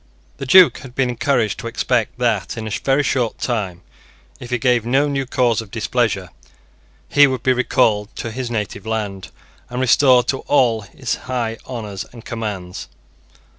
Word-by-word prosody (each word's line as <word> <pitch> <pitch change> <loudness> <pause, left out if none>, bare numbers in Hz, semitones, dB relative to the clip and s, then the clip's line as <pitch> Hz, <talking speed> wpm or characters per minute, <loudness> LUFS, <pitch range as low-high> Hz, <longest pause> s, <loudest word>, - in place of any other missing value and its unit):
The 135 0 -6
Duke 185 +5 +7
had 130 -2 -12
been 130 -2 +1
encouraged 120 -3 0
to - - -5
expect 120 0 -1
that, 115 -4 -1
in 110 - -4
a - - -5
very 135 +6 +1
short 125 -5 0
time, 95 -8 -3 0.6
if 120 - -9
he 125 - 0
gave 120 -1 +2
no 135 +5 +2
new 135 -2 -2
cause 120 -3 +1
of 110 - -12
displeasure, - - -1 0.8
he 145 0 +6
would 130 -3 -3
be 130 -1 +4
recalled 110 -4 +1
to 115 - -5
his 125 +1 -4
native 105 -2 -4
land, 105 -4 -3 0.4
and 125 - -4
restored 125 0 +4
to 135 - 0
all 120 -6 +3
his 120 +5 -4 0.2
high 115 -3 -2
honours 105 -6 -5
and 120 -1 -13
commands. 105 -6 -5
120 Hz, 170 wpm, -20 LUFS, 110-130 Hz, 0.8 s, Duke